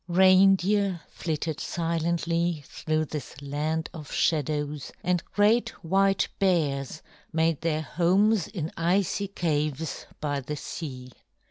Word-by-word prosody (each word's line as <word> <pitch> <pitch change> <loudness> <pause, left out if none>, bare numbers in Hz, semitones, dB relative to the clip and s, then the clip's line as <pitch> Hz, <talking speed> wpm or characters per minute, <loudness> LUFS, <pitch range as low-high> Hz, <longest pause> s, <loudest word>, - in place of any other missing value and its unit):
Reindeer 190 +1 +4
flitted 160 -1 -3
silently 170 -1 -1
through 155 +3 -1
this 145 -3 -7
land 150 +3 -2
of 155 -4 -9
shadows, 150 -2 0
and 180 -1 +1
great 225 +3 +3
white 195 +3 +2
bears 155 -6 0 0.3
made 160 -1 +1
their 155 -2 0
homes 185 +5 +2
in 165 -6 -4
icy 185 +3 +1
caves 155 -4 -2
by 145 -2 -1
the 145 +3 -5
sea. 130 -4 -7
165 Hz, 110 wpm, -27 LUFS, 150-185 Hz, 0.3 s, Reindeer